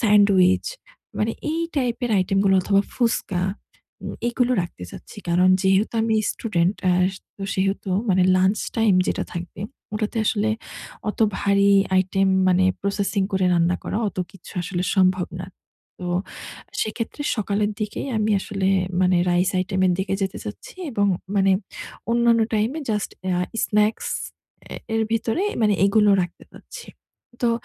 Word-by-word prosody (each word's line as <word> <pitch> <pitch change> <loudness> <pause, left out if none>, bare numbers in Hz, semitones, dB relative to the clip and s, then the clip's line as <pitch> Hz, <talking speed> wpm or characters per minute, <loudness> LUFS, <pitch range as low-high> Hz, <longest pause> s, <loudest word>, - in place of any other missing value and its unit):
Sandwich. 200 -4 +4 0.5
মানে 225 +1 +1 0.2
এই 330 - -1 0.2
টাইপের 245 -2 -1
আইটেমগুলো 195 +1 +2
অথবা 200 +1 +3
ফুচকা 225 -7 0 0.6
উম - - -5 0.2
এগুলো 245 +1 +1
রাখতে 90 - -8
চাচ্ছি। - - -11
কারণ 180 +2 +4
যেহেতু 190 +4 +2
আমি 220 -1 +1 0.2
স্টুডেন্ট 185 -3 0
অ্যা 180 -1 +3 0.4
তো 200 - -8
সেহেতু 195 0 -1 0.2
মানে 185 0 +4
লঞ্চ 190 +3 +2 0.2
টাইম 220 -4 +4
যেটা - - -1
থাকবে, 175 +1 -7 0.3
ওটাতে 215 +1 -2
আসলে 215 +1 +1 0.6
অত - - -12 0.2
ভারী 200 0 +3 0.3
আইটেম 190 +1 +2 0.2
মানে 185 +1 +4 0.2
প্রসেসিং 200 0 0
করে 190 -1 +2
রান্না 170 +1 +2
করা - - -3
অত - - -11 0.2
কিছু 195 - -13
আসলে 180 0 -3
সম্ভব 185 -1 +3
না। 180 - -6 0.5
তো 180 - -5 0.8
সেক্ষেত্রে 230 +6 -4
সকালের 205 0 0
দিকেই 215 +5 -3
আমি 215 0 +1
আসলে 195 -1 -2 0.3
মানে 180 0 +3
রাইস 175 +1 +2
আইটেমের 185 0 +1
দিকে 190 0 -1
যেতে 190 0 -2
চাচ্ছি 105 - -8 0.2
এবং 205 -3 +1 0.3
মানে 195 0 +4 0.6
অন্যান্য 235 -1 +4
টাইম 215 +3 +1 0.2
জাস্ট 210 -1 -1
অ্যা 180 -1 0 0.3
স্নাকস 210 +1 +1 0.7
এ - - -5 0.2
এর 225 - +2
ভিতরেই 230 - 0
মানে 210 -1 +4
এগুলো 210 0 +4
রাখতে 175 - -7
চাচ্ছি। - - -11 0.6
তো 235 - +3
200 Hz, 140 wpm, -23 LUFS, 185-215 Hz, 0.8 s, Sandwich